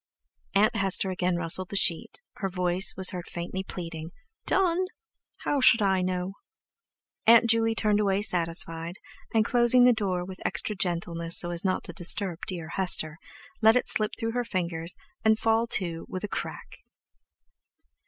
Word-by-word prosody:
Aunt 215 +2 +3
Hester 195 -2 +1
again 180 -1 -1
rustled 175 +2 +1
the - - -7
sheet, 185 - 0 0.2
her 195 - -3
voice 180 +1 +1
was 190 0 +4
heard 180 -2 -7
faintly 175 +2 -5
pleading: 165 -4 -7 0.4
"Done? 370 -1 +1 0.6
How 285 -2 0
should 230 -3 +5
I 190 -1 +1
know?" 185 +1 -3 0.9
Aunt 235 +1 +6
Juley 225 0 +1
turned 210 -2 +1
away 200 -1 0
satisfied, 165 -2 0 0.4
and 220 -2 +2
closing 240 +1 +5
the 250 0 +6
door 185 -5 -2
with 185 0 -10
extra 210 - -2
gentleness 170 -2 -1
so 175 - +3
as 170 -1 -3
not 185 -1 -1
to 175 - -9
disturb 175 +1 -1
dear 170 -4 -5
Hester, 170 -4 0 0.4
let 220 +1 +5
it 250 - 0
slip 215 -1 +2
through 225 0 -2
her 245 +1 -2
fingers 170 -5 -4 0.3
and 220 -1 +3
fall 225 +1 +1
to 170 -7 +1
with 185 - -6
a - - -2
"crack." - - -7
190 Hz, 160 wpm, -26 LUFS, 175-220 Hz, 0.9 s, Aunt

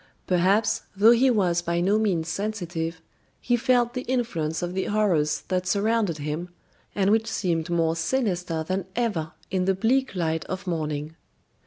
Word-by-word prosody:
Perhaps, 195 +5 +2
though 210 +4 +6
he 245 +3 +5
was 180 -7 +2
by 170 0 -1
no 200 +5 +2
means 180 -7 0
sensitive, 170 -5 -3 0.4
he 245 - +1
felt 240 0 +2
the 250 - -3
influence 225 - -2
of 175 0 -3
the 190 0 -1
horrors 190 -8 +1
that 185 -1 0
surrounded 205 -3 +1
him, 155 +4 -4 0.5
and 195 0 +2
which 225 +1 +2
seemed 170 -7 -1
more 165 -1 +1
sinister 175 -4 -1
than 185 +2 -2
ever 175 -10 -1 0.2
in 185 -1 0
the 190 0 +2
bleak 250 +4 +1
light 160 -2 -1
of 190 +2 -5
morning. 155 -3 -3
185 Hz, 160 wpm, -25 LUFS, 165-220 Hz, 0.5 s, though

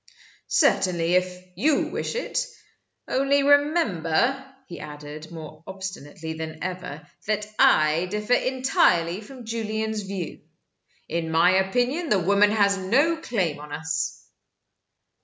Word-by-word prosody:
"Certainly 175 -2 +2
if 180 0 0
you 285 - +2
wish - - -3
it. - - -1 0.6
Only 275 +1 +2
remember," 270 - +2 0.2
he 170 - -9
added, 150 +1 -9
more 155 -1 -10
obstinately 180 -5 -6
than 160 0 -6
ever, 180 -5 -5 0.2
"that 210 0 0
I 155 +3 +4
differ 210 +5 -1
entirely 245 -9 +2
from 245 +2 -11
Julian's 220 -1 -2
view. 195 -4 -6 0.7
In 165 0 -2
my 165 +3 +4
opinion 245 - +1
the 210 - +4
woman 200 +3 +4
has 200 -2 +2
no 275 - +2
claim 190 - -2
on 150 0 -10
us." 150 0 -3
190 Hz, 120 wpm, -25 LUFS, 160-240 Hz, 0.7 s, I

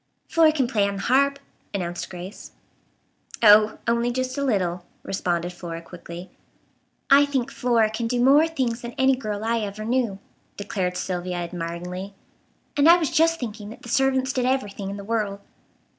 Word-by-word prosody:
"Flora 325 -2 +5
can 285 -4 +1
play 210 -5 +1
on 200 - -3
the 195 - -5
harp," 280 +2 +3 0.4
announced 175 -2 -3
Grace. 180 +2 -9 0.9
"Oh, 215 0 +7
only 235 +1 +1
just 255 +1 -2
a 280 - -2
little," 180 -8 0 0.2
responded 175 -2 -2
Flora 170 -2 -6
quickly. 170 +1 -10 0.8
"I 280 +1 +8
think 275 -4 -1
Flora 230 -3 +2
can 230 +1 -2
do 245 +1 -1
more 280 +6 +5
things 250 -7 -2
than 240 0 -7
any 265 +1 +3
girl 215 -5 -4
I 230 +1 +1
ever 210 0 -5
knew," 235 -4 0 0.4
declared 185 -3 -2
Sylvia 180 -1 -3
admiringly; 175 +3 -5 0.6
"and 290 +3 +5
I 345 - +9
was 320 -5 -1
just 330 +1 +3
thinking 210 -4 -6
that 225 - -12
the 240 - -9
servants 265 +1 +2
did 250 -1 0
everything 205 -7 -2
in 200 - -5
the 200 - -7
world." 205 -2 -2
220 Hz, 170 wpm, -24 LUFS, 190-260 Hz, 0.9 s, I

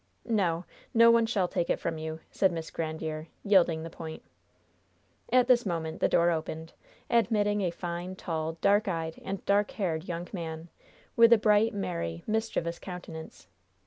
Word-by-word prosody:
"No, 180 -7 0 0.3
no 230 0 +8
one 230 -1 +4
shall 200 -6 +1
take 175 -1 -2
it - - +1
from 165 -1 -3
you," 160 0 -5
said 190 -2 +2
Miss 165 -2 -5
Grandiere, 160 -1 -4 0.2
yielding 175 -5 +3
the 165 - -6
point. 160 -1 -8 1.1
At 250 0 +5
this 245 -1 +5
moment 165 -4 -3
the - - +2
door 170 0 +4
opened, 160 0 -4 0.3
admitting 210 -3 +2
a 185 - +1
fine, 175 +1 -5
tall, 160 -3 -3
dark 205 +2 +3
eyed 165 -3 -3
and 195 0 -5
dark 205 +1 +3
haired 170 -5 -2
young 175 0 -4
man, 165 -2 -5 0.5
with 230 0 +7
a 235 - +9
bright, 210 +1 +3
merry, 85 - -3
mischievous 215 -6 -1
countenance. 165 - -9
175 Hz, 160 wpm, -29 LUFS, 160-205 Hz, 1.1 s, a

